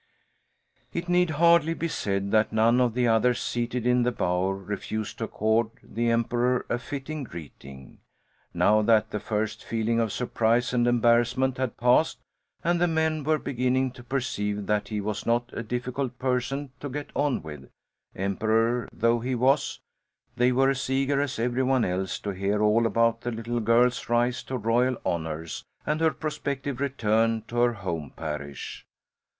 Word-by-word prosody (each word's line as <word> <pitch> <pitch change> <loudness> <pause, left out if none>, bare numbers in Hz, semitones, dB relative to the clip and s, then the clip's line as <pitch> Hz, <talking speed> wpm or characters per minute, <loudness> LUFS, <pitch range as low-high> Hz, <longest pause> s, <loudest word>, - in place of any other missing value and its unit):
It 170 +1 -4
need 180 0 +3
hardly 165 +1 +4
be 165 - -2
said 100 -9 -2
that 110 -1 +3
none 115 +3 +3
of 120 -2 +1
the 125 -1 +2
others 115 +2 +3
seated 120 0 -2
in 125 0 +3
the 125 +1 +2
bower 90 -2 0
refused 100 +2 -5
to - - -1
accord 110 +1 +1
the 120 +1 -1
Emperor 120 +2 +1
a 120 - 0
fitting 145 +3 -5
greeting. 70 - -11 0.5
Now 105 +1 +3
that 110 0 +3
the 105 - -2
first 110 +1 -3
feeling 115 0 0
of 115 -2 0
surprise 120 +1 +1
and 120 -1 +2
embarrassment 120 +2 +2
had 130 -3 -2
passed 125 +6 +3 0.5
and 175 0 +1
the 175 - +4
men 160 -2 0
were 155 +2 +2
beginning 130 -1 0
to 125 -1 -13
perceive 105 -6 -2
that 105 +1 0
he 105 -1 -3
was 105 0 -4
not 120 +1 +1
a - - -3
difficult 125 +2 -3
person 130 +2 -1
to 145 - -5
get 145 +2 -6
on 145 - 0
with, 75 -3 -9 0.5
emperor 110 +5 0
though 115 +1 +2
he 125 +2 -2
was, 130 +3 +1 0.5
they 125 +1 +3
were 135 +2 +3
as 135 0 -3
eager 135 +1 +1
as 145 -2 -2
was 115 - 0
every 125 +1 0
one 130 -2 +2
else 95 +1 -2
to 100 - -3
hear 100 +2 -1
all 110 +2 +4
about 115 +1 +2
the 120 - -3
little 115 +1 -3
girl's 115 +2 +2
rise 120 +1 +1
to 130 - -3
royal 120 +3 +1
honours 80 -1 -3 0.2
and 155 +1 -1
her 160 - +5
prospective 140 -4 -4
return 115 -5 +1
to 120 - -6
her 120 0 +3
home 85 -8 -4
parish. 75 -3 -6
120 Hz, 170 wpm, -26 LUFS, 110-130 Hz, 0.5 s, her